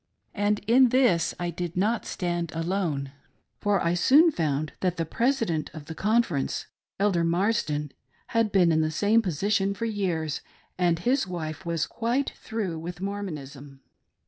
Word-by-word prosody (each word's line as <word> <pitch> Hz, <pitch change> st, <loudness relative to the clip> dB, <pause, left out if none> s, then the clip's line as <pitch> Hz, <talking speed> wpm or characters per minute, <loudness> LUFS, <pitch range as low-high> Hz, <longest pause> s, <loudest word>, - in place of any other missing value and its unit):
And 205 Hz, +1 st, +1 dB
in 250 Hz, +3 st, +6 dB
this 240 Hz, -10 st, +3 dB
I 175 Hz, 0 st, -2 dB
did 175 Hz, +1 st, -5 dB
not 215 Hz, +5 st, +1 dB
stand 175 Hz, -2 st, -2 dB
alone, 165 Hz, -5 st, -1 dB, 0.5 s
for 205 Hz, -1 st, +2 dB
I 170 Hz, -, +1 dB
soon 290 Hz, -, +5 dB
found 155 Hz, -, -1 dB
that 180 Hz, -2 st, 0 dB
the 165 Hz, -, -1 dB
President 225 Hz, -, 0 dB
of 155 Hz, -2 st, -8 dB
the 160 Hz, -, -7 dB
Conference 210 Hz, -, 0 dB, 0.2 s
— -, -, -67 dB
Elder 195 Hz, -4 st, +2 dB
Marsden 165 Hz, -5 st, 0 dB, 0.2 s
— -, -, -38 dB
had 225 Hz, -2 st, +3 dB
been 180 Hz, -4 st, +4 dB
in 160 Hz, 0 st, +3 dB
the 155 Hz, -, +1 dB
same 210 Hz, +8 st, +3 dB
position 200 Hz, +2 st, 0 dB
for 230 Hz, -, -3 dB
years, 180 Hz, -8 st, -2 dB, 0.3 s
and 175 Hz, -2 st, +2 dB
his 245 Hz, +6 st, +1 dB
wife 165 Hz, -2 st, -5 dB
was 165 Hz, -2 st, 0 dB
"quite 240 Hz, +4 st, -1 dB
through" 200 Hz, -8 st, -4 dB
with 175 Hz, +2 st, -7 dB
Mormonism. 150 Hz, -9 st, -6 dB
180 Hz, 160 wpm, -26 LUFS, 160-210 Hz, 0.5 s, in